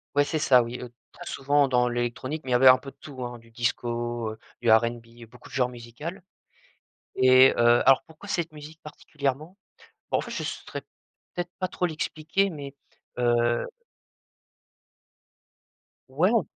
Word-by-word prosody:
Ouais, 145 - +5
c'est 155 - -2
ça, 130 -4 +5
oui, 120 +1 -5
heu, 125 -1 -9 0.2
très - - -12
souvent 140 +1 +2
dans 125 -1 +2
l'électronique, 120 +5 -3
mais 130 - -4
ils - - +3
avaient 125 +2 +6
un 130 0 +9
peu 135 +1 -10
de - - -31
tout, 135 -4 -8
hein, 120 0 -7
du 115 0 -20
disco, 120 -1 -2 0.3
du 120 - +1
RnB, 115 +1 +1
beaucoup 125 +2 -16
de - - -16
genres 125 -2 +2
musicals 125 +9 -8 0.9
et 130 +1 +7
heu, - - -6 0.3
alors 135 0 +6
pourquoi 160 +5 -14
cette 170 -5 -2
musique, 155 +1 -12
particulièrement? 150 +2 -4 0.5
Bon, - - +2
en - - -1
fait, - - -8
je - - -3
saurais - - -6 0.5
peut-être 175 0 -3
pas 185 - 0
trop 180 - -2
l'expliquer 160 +3 -1
mais 140 -5 -8 0.5
heu 120 -1 +2 2.4
Ouais, 155 +8 +2
on 230 -5 +3
130 Hz, 165 wpm, -26 LUFS, 120-155 Hz, 2.4 s, un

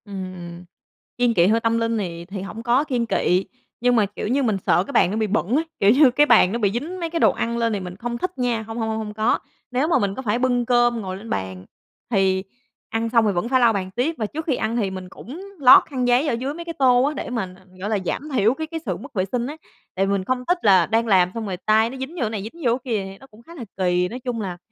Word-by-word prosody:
Ừm, 185 -3 -8 0.5
kiêng 245 -1 +2
kị 175 -4 +4
hơi 220 +3 +3
tâm 230 0 +1
linh 230 0 0
thì 170 -4 -4
thì 195 +1 -6
hổng 210 +4 -7
có 245 +4 +3
kiêng 250 -6 -1
kị, 185 -4 +1 0.4
nhưng 245 0 +3
mà, 215 -3 +4
kiểu 205 +1 -6
như, 270 +5 +1
mình 220 -5 +1
sợ 175 +2 +4
cái - - -9
bàn 180 - +4
nó 210 - -2
bị 220 -1 0
bẩn 215 +2 0
ấy, 320 +3 +1
kiểu 200 - +5
như 265 +1 +6
cái 290 +4 +4
bàn 225 -9 +5
nó 235 - -2
bị 205 -4 +2
dính 315 +10 -4
mấy 335 -1 -3
cái 335 0 -2
đồ - - +5
ăn 235 0 -2
lên 230 -1 0
thì 205 - -1
mình 180 -1 -7
không 235 +2 -4
thích 365 +6 -4
nha. 245 -3 0
Hông, 225 +1 -8
hông, 220 -1 -1
hông, 220 - -2
hông 210 -1 -5
có. 215 +2 +1 0.3
Nếu 255 +5 +1
mà 335 - +3
mình 200 -1 -1
có - - -5
phải 235 -1 0
bưng 245 -1 +1
cơm 240 -1 +2
ngồi 185 -2 -5
lên 220 +4 -11
bàn 95 -1 -4 0.5
thì 190 -3 +2 0.5
ăn 225 0 -1
xong 230 -1 +3
thì 210 - +2
vẫn 190 +5 -2
phải 260 0 +3
lau 235 -2 +4
bàn 190 -2 -3
tiếp. 255 +10 -1
Và 220 - -1
trước 310 +9 -5
khi 280 - +1
ăn 225 +1 -2
thì 200 -5 0
mình 185 -1 -7
cũng 275 - -10 0.2
lót 260 -2 +8
khăn 255 -4 -2
giấy 250 +5 +3
ở - - +1
dưới 260 +5 -3
mấy 340 +2 -8
cái 335 - -5
tô 250 -2 +5
á 290 +2 +1
để 275 - -5
mà, 215 -7 -3
ờ, 190 - -21
gọi 200 +3 -4
là, 215 - +1
giảm 300 - -3
thiểu 225 0 +3
cái 315 +3 -5
cái 325 +1 -5
sự - - -2
mất - - -11
vệ 190 -4 0
sinh 245 -1 -1
á. 295 +3 -7 0.4
Tại 190 +1 +1
vì 195 - -1
mình 200 -1 0
không 255 +2 -1
thích 355 - +3
là 190 -4 +6
đang 225 +4 0
làm 185 -4 +4
xong 225 -1 -3
rồi 190 -3 -4
tay 220 +1 +4
nó 265 - -8
dính 265 +6 -6
vô 340 - -5
cái 225 - 0
này 215 -3 -4
dính 230 +11 -10
vô 235 - +4
cái 255 -2 -5
kia 205 -3 0
thì 195 0 -9
nó 270 - -16
cũng 215 -3 -18
khá 335 +7 -13
là 255 -8 -7
kì. 180 -1 +1
Nói 245 - -6
chung 245 -3 -4
là 185 -3 -5
230 Hz, 300 wpm, -22 LUFS, 195-250 Hz, 0.5 s, lót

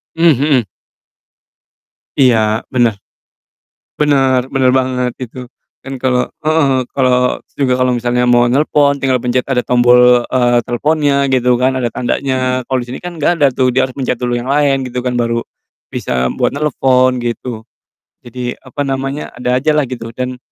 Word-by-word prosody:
Mmm, 165 +1 +4
mhm. 135 -4 +1 1.5
Iya, 110 -4 +2
bener. 120 -5 0 1.0
Bener 135 -4 +2
bener 130 -1 +3
banget 125 -1 0
itu. 125 0 -8 0.3
Dan 135 0 -7
kalo 125 -1 0
heeh 155 0 +2
heeh, 130 -1 +1
kalo 125 -1 +1
s - - -41
juga 130 -3 +2
kalo 125 0 +2
misalnya 120 +1 0
mau 120 0 +4
nelpon, 140 +2 +2
tinggal 130 -1 +2
pencet 125 +1 0
ada 125 -2 +1
tombol, 125 0 +5
eee, 120 -1 +2
teleponnya 140 +3 0
gitu 125 -2 +2
kan, 130 +1 +1
ada 120 -2 -1
tandanya, 130 +1 -1
kalo 130 - -1
disini 125 +2 -7
kan 175 -1 -7
nggak 165 +3 +1
ada - - +7
tuh, 130 0 +2
dia 130 - +3
harus 130 - -12
pencet 130 -2 -1
dulu 120 -1 -2
yang 125 +2 -5
lain 140 -1 +2
gitu 125 0 -4
kan, 125 0 -2
baru 115 0 0 0.5
bisa 65 -1 -2
buat - - 0
nelepon, 130 -3 +1
gitu. 120 -1 -4 0.6
Jadi, 125 +1 -5
apa 130 +2 -7
namanya, 135 +2 -4
ada 125 +1 -1
aja 150 +4 +1
lah 150 -2 +1
gitu 115 -2 -7
dan, 125 +1 -4
130 Hz, 165 wpm, -15 LUFS, 125-135 Hz, 1.5 s, ada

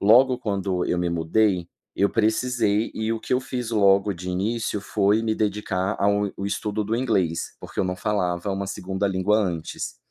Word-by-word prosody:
logo 125 +5 +5
quando 95 -5 -1
eu - - 0
me 90 0 0
mudei, 85 +2 +1 0.3
eu 100 - +3
precisei 110 -1 +1
e 110 +1 -1
o 115 - -2
que - - -4
eu 125 - +2
fiz 125 -3 -4
logo 100 -2 +4
de 90 +1 -6
início 105 +3 -1
foi 105 +2 +2
me 110 -1 0
dedicar 105 -2 -1
ao 100 0 +2
o 100 - -3
estudo 105 +1 -2
do 110 +3 -1
inglês, 95 -10 0
porque - - -4
eu - - +1
não 90 0 -2
falava 90 -2 -1
uma 95 0 -3
2a 95 +1 -2
língua 95 +3 +2
antes. 85 - -3
100 Hz, 185 wpm, -24 LUFS, 95-110 Hz, 0.3 s, logo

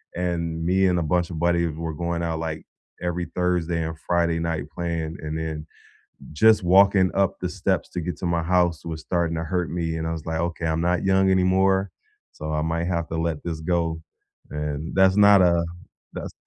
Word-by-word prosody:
and 85 -2 -2
me 95 +2 +3
and 90 -1 +2
a - - 0
bunch 85 +2 0
of 80 - -6
buddies 85 -1 +2
we 75 - -10
were 80 -1 -3
going 85 +1 -2
out, 80 -1 -2
like, 80 -1 -4 0.4
every 85 0 -2
Thursday 90 -2 0
and 80 -1 -6
Friday 85 -1 +1
night 80 -3 -2
playing, 85 -2 -3
and 80 +1 -4
then 80 -1 -4 0.7
just 110 +5 +5
walking 95 +1 +5
up 100 -1 +1
the - - -2
steps - - -1
to 90 - -3
get 85 -1 -4
to - - -7
my 85 -1 0
house 85 -1 +1
was 80 -1 -5
starting 85 -1 -1
to 80 - -2
hurt 90 0 -2
me, 85 -2 -2
and 80 0 -3
I - - -2
was 80 -2 -6
like, 80 0 -1
"Okay, 85 -1 -2
I'm 80 +1 0
not 90 +2 +1
young 95 0 +3
anymore, 95 +1 +3 0.4
so 75 0 -6
I 75 0 0
might 80 +1 -1
have 85 -2 -1
to 80 - -4
let 80 -2 -2
this 80 -2 -4
go," 85 -1 -1 0.5
and, 75 +1 -4
that's 95 +1 +4
not 100 -2 +7
a 85 -1 +3 0.5
that's - - -6
85 Hz, 210 wpm, -24 LUFS, 80-90 Hz, 0.7 s, not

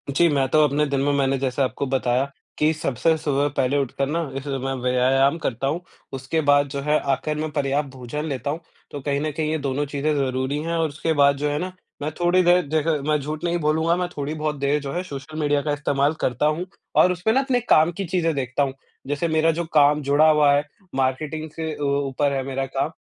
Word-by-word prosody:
जी, 170 +5 +3
मैं 140 -3 +1
तो 155 +2 +4
अपने 145 +2 +1
दिन 140 -1 0
में 145 +1 +2
मैंने 135 -1 +1
जैसे 135 0 -1
आपको 135 +1 -1
बताया, 130 +1 0 0.3
कि 150 +1 +3
सबसे 160 0 +1
सुबह 145 -2 0
पहले 135 +2 +2
उठकर 135 0 -1
ना 165 +4 -1 0.2
इस 135 - -5
समय 140 -1 -3
मैं 135 +1 -2 0.2
व्यायाम 135 +4 +3
करता 135 -2 -2
हूँ। 165 +5 -1 0.3
उसके 135 +5 -1
बाद 145 0 +5
जो 140 0 -4
है 150 +2 +2
आख़िर 150 +3 -1
में 155 +1 -2
पर्याप्त 145 0 0
भोजन 130 +4 -5
लेता 140 -3 -3
हूँ, 155 - -4 0.3
तो 145 - -5
कहीं 140 +1 -1
न 155 0 -1
कहीं 155 +1 -2
ये 160 - 0
दोनों 140 0 -2
चीज़ें 145 +2 -1
ज़रूरी 130 0 -1
हैं। 165 +1 -2
और 165 -1 +1
उसके 155 +3 -1
बाद 140 -1 +4
जो 150 +1 -1
है 145 - -1
ना 185 +2 -3 0.3
मैं 150 +2 -2
थोड़ी 175 +1 +4
देर 175 +1 +5
देखे 155 +1 +1
मैं 150 - +3
झूठ 150 +3 -5
नहीं 175 0 +1
बोलूँगा 160 +2 +2
मैं 180 0 -1
थोड़ी 145 +1 -2
बहुत 155 -1 -2
देर 140 +2 +1
जो 140 -1 -5
है 180 - -2
सोशल 155 -1 -7
मीडिया 145 -1 +1
का 150 - -2
इस्तेमाल 145 0 +1
करता 125 +4 0
हूँ 155 +4 0 0.4
और 180 - +4
उसपे 180 +4 0
ना 260 - +3
अपने 265 -2 +1
काम 160 +2 +5
की 195 - -2
चीज़ें 165 -2 0
देखता 130 +1 0
हूँ। 135 -1 -2 0.3
जैसे 145 +4 -1
मेरा 160 0 +3
जो 170 +1 -3
काम 150 0 +5
जुड़ा 145 +3 +4
हुआ 150 -2 +5
है, 145 +1 +2 0.3
मार्केटिंग 150 +4 -1
से 160 -1 -3
अ, 150 - -9
ऊपर 140 0 0
है 135 -1 -1
मेरा 135 0 -2
काम 135 +3 -2
145 Hz, 235 wpm, -23 LUFS, 135-155 Hz, 0.4 s, बाद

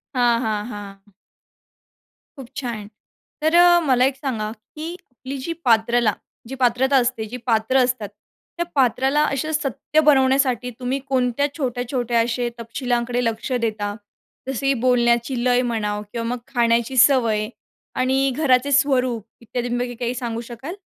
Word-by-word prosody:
हां, 240 -2 +3
हां, 215 -3 -2
हां. 200 -1 -10 1.2
खूप 265 -3 -9
छान. 235 -6 -4 0.5
तर 315 +2 +2
अ, 350 0 +7
मला 255 -1 +4
एक 270 0 0
सांगा 230 -6 -3
की 305 +9 -8
आपली 270 -4 -9
जी 335 - -2
पात्रला, 230 -1 +3 0.3
जी 265 - -6
पात्रता 260 +3 +3
असते 235 -3 -2
जी 235 +4 -7
पात्र 225 +3 +2
असतात 245 -5 -2 0.5
त्या 345 - -1
पात्राला 265 +3 +2
अशा 290 +2 -2
सत्य 305 0 0
बनवण्यासाठी 265 -3 +3
तुम्ही 255 +2 -2
कोणत्या 260 +1 +1
छोट्या-छोट्या 245 -3 -1
असे 240 +1 -1
तपशिलांकडे 240 +1 -2
लक्ष 230 +2 -2
देता, 210 -2 -2 0.5
जसे 270 +1 0
बोलण्याची 240 0 +2
लय 250 0 +3
म्हणा 220 -4 -2
किंवा 230 -1 -3
मग 245 +1 -2 0.2
खाण्याची 235 +1 +1
सवय 235 -5 +4 0.5
आणि 265 +1 +2
घराचे 280 -2 +3
स्वरूप 255 -5 +2 0.2
इत्यादींपैकी 245 +1 -3
काही 240 +1 -2
सांगू 235 -2 -3
शकाल? 265 +9 -7
245 Hz, 135 wpm, -22 LUFS, 230-265 Hz, 1.2 s, अ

